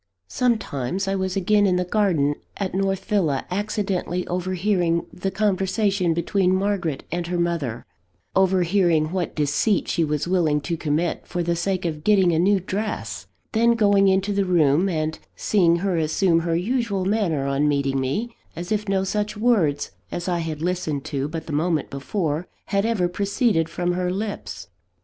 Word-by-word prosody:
Sometimes, 195 - -1
I 195 - 0
was 190 -1 -1
again 205 +2 +3
in 185 - +2
the 180 0 0
garden 175 -8 +2 0.2
at 195 -2 -3
North 195 0 -1
Villa 170 -11 0
accidentally 195 -3 -2
overhearing 180 -1 0
the 195 +2 -2
conversation 195 -2 +1
between 185 +2 +1
Margaret 190 -7 -1
and 175 0 -2
her 175 0 -1
mother 170 -9 -2 0.5
overhearing 180 -4 +3
what 180 -2 -2
deceit 150 +8 +1
she 170 - +1
was 150 0 -1
willing 170 -5 +2
to 155 +4 -2
commit, 160 +2 -1
for 175 -2 -2
the 170 0 0
sake 185 +1 -1
of 155 -2 -3
getting 190 -3 +4
a 160 - +1
new 195 +3 +3
dress 205 +4 -4 0.2
then 235 +1 +4
going 205 -3 +4
into 195 +2 +2
the 200 0 +2
room, 170 -1 +3
and 155 -2 -2 0.2
seeing 175 -5 +3
her 180 0 0
assume 165 +2 +2
her 165 0 -1
usual 205 0 -1
manner 190 -9 0
on 140 +2 +1
meeting 140 -2 +1
me, 205 - -2 0.2
as 175 +4 -6
if 210 -1 -1
no 190 -1 +1
such 210 +2 -2
words 210 -11 +1 0.2
as 175 - -4
I 175 -1 0
had 160 -2 -4
listened 160 -5 -2
to 140 0 0
but 160 +1 -5
the 155 - -6
moment 160 0 0
before, 155 +3 -2 0.2
had 200 +2 0
ever 205 -6 +1
proceeded 200 - 0
from 175 +1 -1
her 180 0 -1
lips. 195 - -5
180 Hz, 170 wpm, -23 LUFS, 160-200 Hz, 0.5 s, getting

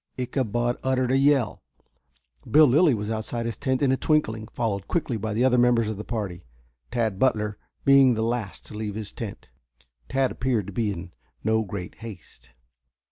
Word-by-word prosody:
Ichabod 120 -2 -1
uttered 130 -1 +1
a 135 - +4
yell. 135 -5 +2 0.9
Bill 155 +1 +7
Lilly 145 +1 +4
was 105 +1 -3
outside 115 +1 -3
his 115 - -4
tent 130 -1 0
in 135 - +4
a 130 - +2
twinkling, 110 -9 0
followed 105 -6 -2
quickly 155 -8 -1
by 110 0 -3
the 120 +3 +3
other 125 -1 +4
members 120 -2 +4
of 110 -2 -3
the 105 - -5
party, 100 -6 -4 0.5
Tad 110 -4 -1
Butler 105 -5 +1 0.3
being 135 -3 +6
the 110 - -1
last 115 -4 -3
to - - -9
leave 105 -1 -4
his 110 -1 -5
tent. 110 - -7 0.6
Tad 135 -1 +1
appeared 120 -6 -1
to 100 - -8
be 110 0 0
in 90 -1 -7 0.3
no 110 +1 +2
great 95 -3 -6
haste. 110 -7 -11
115 Hz, 180 wpm, -25 LUFS, 105-130 Hz, 0.9 s, Bill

